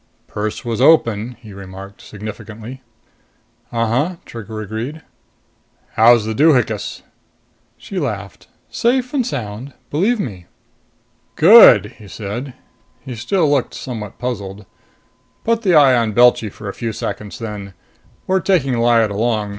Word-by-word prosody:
"Purse 105 +2 -5
was 115 0 -2
open," 125 -6 +3
he 110 -4 -12
remarked 95 0 -11
significantly. 110 +4 -9 0.9
"Uh 115 -1 0
huh," 130 +11 0
Trigger 110 -1 -8
agreed. 115 +9 -6 0.9
"How's 115 0 +5
the 110 - -2
doohinkus?" 125 -6 +1 0.7
She 195 - -6
laughed. 100 - -5 0.2
"Safe 250 +2 0
and 275 -3 +1
sound! 125 0 -6 0.2
Believe 205 +11 +1
me." 95 - -6 0.9
"Good," 140 - +7
he 105 - -13
said. 115 +7 -6 0.5
He 130 - -8
still 160 - 0
looked 145 -3 0
somewhat 110 -6 -7
puzzled. 105 -5 -5 0.8
"Put 230 0 +1
the 185 -6 +2
eye 140 -4 +6
on 115 -3 0
Belchy 120 -1 +4
for 105 - -10
a 100 - -4
few 115 -2 -4
seconds 105 -1 -5
then. 105 -5 -7 0.5
We're 190 0 +1
taking 145 -10 +1
Lyad 115 -2 +3
along. 105 0 -1
115 Hz, 130 wpm, -18 LUFS, 105-140 Hz, 0.9 s, Good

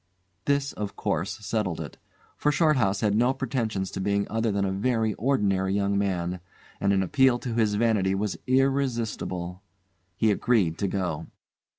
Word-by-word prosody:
This, 140 0 +1
of 105 -1 -5
course, 85 +6 -2
settled 105 -7 -1
it, - - -7 0.4
for 150 - +1
Shorthouse 130 - +2
had 105 -2 +2
no 120 +5 +3
pretensions 115 -8 -2
to - - -5
being 100 +1 +1
other 115 0 +1
than 100 0 0
a 95 - -1
very 110 +2 0
ordinary 100 -5 +1
young 100 0 +1
man, 90 -3 -1 0.4
and 100 - +2
an 95 -1 +3
appeal 130 +4 +3
to 120 -1 -5
his 110 -3 +2
vanity 105 -4 +2
was 100 0 -1
irresistible. 120 -9 0 0.5
He 110 +2 +3
agreed 100 -6 +1
to 100 - +1
go. 90 -5 -2
105 Hz, 160 wpm, -26 LUFS, 95-120 Hz, 0.5 s, no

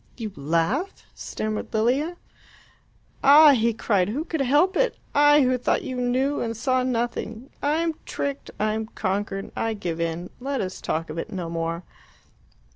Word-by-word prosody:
"You 220 -4 -5
laugh?" 165 - -1
stammered 215 0 -4
Lilia. 265 +10 +1 1.1
"Ah!" 295 +2 +9
he 235 -3 +3
cried, 205 -4 +1
"who 285 +9 -2
could 320 -4 -2
help 295 +9 +3
it? - - +1 0.2
I, 290 +1 +6
who 255 0 +2
thought - - +1
you 255 - -4
knew 255 +3 0
and 230 -1 -3
saw 255 +2 +1
nothing 240 0 -3
I 290 +1 +1
am 330 0 0
tricked 280 -1 -4
I 215 0 +1
am 220 0 -3
conquered. 195 -1 -3
I 225 -1 -1
give 170 -5 -4
in. 170 +2 -3
Let 270 +1 -2
us 185 -1 -4
talk 160 0 -2
of 160 - -5
it - - -5
no 175 -3 -4
more." 165 +1 -3
235 Hz, 165 wpm, -24 LUFS, 195-280 Hz, 1.1 s, Ah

